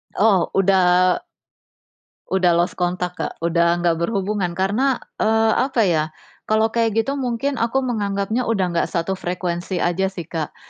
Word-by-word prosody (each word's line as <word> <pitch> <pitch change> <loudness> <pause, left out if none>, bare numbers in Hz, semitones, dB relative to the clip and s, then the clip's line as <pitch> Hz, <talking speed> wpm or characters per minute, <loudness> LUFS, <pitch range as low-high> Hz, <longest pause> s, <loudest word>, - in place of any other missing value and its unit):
Oh, 200 -3 +3
udah 185 -2 +3 1.1
udah 180 -3 +3
lost 175 +2 0
contact, 180 0 -2
Kak, - - -3
udah 170 +1 +2
nggak 170 -1 +2
berhubungan. 195 -1 -1
Karena, 210 +9 +1 0.2
eee, 220 0 +3
apa 260 -3 +1
ya, 165 -6 +2 0.4
kalau 220 +1 +2
kayak 225 -2 0
gitu 275 +3 -3
mungkin 255 +2 -2
aku 240 +4 0
menganggapnya 215 0 -1
udah 205 -5 +1
nggak 170 - 0
satu 175 +3 -1
frekuensi 180 0 -3
aja 180 +2 +1
sih 190 -2 -6
Kak, 160 -3 -4
190 Hz, 145 wpm, -21 LUFS, 175-225 Hz, 1.1 s, Oh